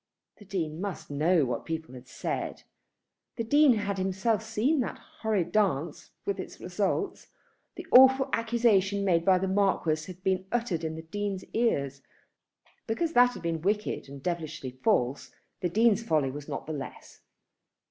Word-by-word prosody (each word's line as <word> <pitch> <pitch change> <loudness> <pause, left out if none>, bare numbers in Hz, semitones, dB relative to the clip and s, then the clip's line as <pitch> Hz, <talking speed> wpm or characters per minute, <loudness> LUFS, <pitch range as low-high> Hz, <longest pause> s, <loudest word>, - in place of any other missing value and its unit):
The 205 - -15
Dean 170 -4 -3
must 200 -6 -5
know 155 +2 +3
what 125 - -3
people 160 -4 -5
had 125 0 -11
said. - - -4 0.7
The 230 - -2
Dean 290 +3 +5
had 205 -3 -2
himself 190 +4 0
seen 225 +7 0
that 250 - -2
horrid 200 -6 -2
dance, 170 -7 0 0.2
with 200 -1 -2
its - - -7
results. 200 - -2 0.5
The - - -8
awful 265 +1 +7
accusation 215 -4 +2
made 170 -3 +3
by 185 +1 +5
the 190 +1 -1
Marquis 185 -5 +1
had 185 +1 -15
been 190 -1 0
uttered 225 -9 -1
in 160 0 -3
the 160 - -7
Dean's 200 +3 -3
ears. 140 - 0 0.9
Because 320 +9 -1
that 245 0 +5
had - - -9
been 165 -1 -2
wicked 205 -5 -1
and 140 -1 -10
devilishly 155 -6 -3
false, 125 +3 +1 0.2
the 180 - -1
Dean's 220 +3 +3
folly 155 -10 +1
was 145 +1 -8
not - - -4
the 155 - -4
less. 140 -3 -8
190 Hz, 160 wpm, -28 LUFS, 160-220 Hz, 0.9 s, awful